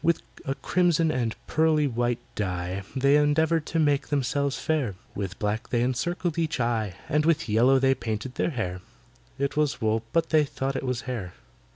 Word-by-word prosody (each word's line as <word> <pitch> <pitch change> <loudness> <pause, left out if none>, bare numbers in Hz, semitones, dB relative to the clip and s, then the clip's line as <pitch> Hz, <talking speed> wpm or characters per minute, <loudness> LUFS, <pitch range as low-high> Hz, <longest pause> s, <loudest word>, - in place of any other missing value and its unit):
With 170 -1 +2 0.2
a 135 - -1
crimson 170 -2 +2
and 120 -5 -1
pearly 155 -1 +2
white 120 -2 0 0.2
dye 90 -1 -2
They 140 +2 +4
endeavoured 155 +2 +2
to 165 - -2
make 145 -3 +2
themselves 140 0 0
fair, 140 -11 -1 0.2
With 95 -3 -4
black 105 +2 -2
they 120 -1 +1
encircled 170 +7 -1
each 160 -4 -1
eye, 110 -5 0
And 150 +1 +2
with 165 0 +2
yellow 120 +5 +4
they 135 0 +4
painted 120 0 -4
their - - 0
hair 95 - -3 0.6
(It 140 +2 -1
was 150 -2 +1
wool, 110 0 +1
but 165 -1 +1
they 155 -2 +5
thought 135 -1 -3
it 135 - -1
was 125 -1 -1
hair). 110 -10 -5
135 Hz, 180 wpm, -26 LUFS, 115-150 Hz, 0.6 s, they